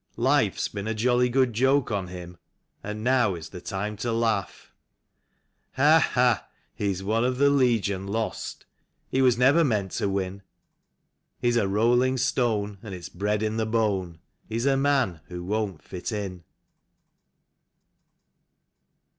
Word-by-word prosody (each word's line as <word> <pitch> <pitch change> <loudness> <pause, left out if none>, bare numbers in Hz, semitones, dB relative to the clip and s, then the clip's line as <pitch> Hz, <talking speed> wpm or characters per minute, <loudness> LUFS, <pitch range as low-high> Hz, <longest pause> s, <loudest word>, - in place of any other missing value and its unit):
Life's - - +2
been 100 0 -6
a 110 - -1
jolly 125 +2 +2
good 130 -1 +2
joke 130 +3 +2
on 100 -3 -2
him, 90 -1 -9 0.4
And 105 +1 -5
now 120 -6 +2
is 80 -2 -8
the 90 - -9
time 105 +2 -4
to 115 +3 -2
laugh. 115 -4 -1 1.0
Ha, 150 +4 +5
ha! 125 -3 +2 0.3
He 100 - -2
is 95 0 -3
one 110 +4 +1
of 125 0 0
the 140 +1 +4
Legion 115 -8 +1
Lost; 110 +2 -4 0.4
He 135 - +1
was 125 -3 +4
never 135 +7 +5
meant 105 - 0
to 100 - -1
win; 95 0 -3 1.0
He's 120 -1 +1
a 115 -4 +2
rolling 120 +6 +2
stone, 110 -5 0
and 100 -4 -7
it's 90 -2 -8
bred 105 +3 -1
in 110 +1 -1
the 110 -1 0
bone; 100 -7 0 0.3
He's 115 +3 -2
a 140 -1 +3
man 135 - +1
who" 90 -1 -7
won't 100 -3 -2
fit 90 +4 -6
in. 95 -5 -5
110 Hz, 145 wpm, -26 LUFS, 100-125 Hz, 1.0 s, Ha